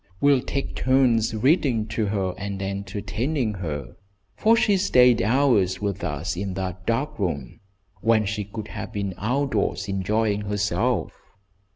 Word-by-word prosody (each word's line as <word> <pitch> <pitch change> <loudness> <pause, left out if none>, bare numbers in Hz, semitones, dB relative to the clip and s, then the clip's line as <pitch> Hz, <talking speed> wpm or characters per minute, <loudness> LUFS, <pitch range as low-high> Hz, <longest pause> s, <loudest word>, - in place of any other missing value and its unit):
We'll 140 -2 +4
take 140 +1 -3
turns 125 -4 +2
reading 130 - +2
to 110 -1 -1
her 95 -3 -1
and 100 -1 -5
entertaining 105 +6 -2
her, 75 -8 -5 0.4
for 225 +1 +4
she 205 -3 +3
stayed 125 - +5
hours 110 -5 +2
with 100 -1 -3
us 75 +5 -2
in 95 0 -4
that 95 -1 -5
dark 130 +3 -1
room 80 -9 -3 0.4
when 110 0 +3
she 105 +1 -2
could 105 +1 -7
have - - -6
been 100 -3 -3
outdoors 115 -3 0
enjoying 105 +2 0
herself." 105 +3 0
105 Hz, 140 wpm, -24 LUFS, 95-125 Hz, 0.4 s, stayed